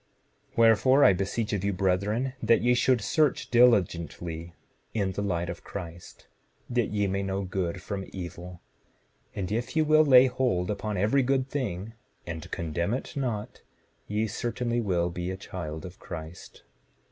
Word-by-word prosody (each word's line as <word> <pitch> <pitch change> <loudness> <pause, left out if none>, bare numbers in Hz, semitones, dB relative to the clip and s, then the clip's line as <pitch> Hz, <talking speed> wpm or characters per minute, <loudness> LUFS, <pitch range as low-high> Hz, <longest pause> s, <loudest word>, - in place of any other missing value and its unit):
7:19 - - -27
Wherefore, 115 +5 +5
I - - +7
beseech 100 +4 -2
of 100 -2 -1
you, 100 0 0
brethren, 100 +7 0
that 115 - +3
ye 125 +1 +4
should 125 -1 +3
search 150 +5 +1
diligently 85 -8 +2 0.4
in 100 -3 0
the 100 - -3
light 90 -4 -1
of - - -6
Christ 85 -3 -9 0.5
that 120 -2 +1
ye 105 -1 0
may 95 0 -1
know 95 0 -2
good 90 -1 -3
from 95 -1 -5
evil; 90 -1 -8 0.7
and 95 -1 -3
if 120 +7 -2
ye 160 - +4
will 155 0 +5
lay 130 -3 +7
hold 125 -8 0
upon 105 0 -3
every 110 +9 +3
good 130 0 +1
thing, 110 -7 -4 0.3
and 80 -2 -6
condemn 85 +6 -2
it 135 - -6
not, 120 -7 -3 0.5
ye 105 +2 0
certainly 120 +2 -2
will 90 -5 0
be 90 +1 -4
a 95 - -4
child 85 -5 -6
of 90 0 -10
Christ. 80 0 -9
100 Hz, 160 wpm, -27 LUFS, 90-120 Hz, 0.7 s, I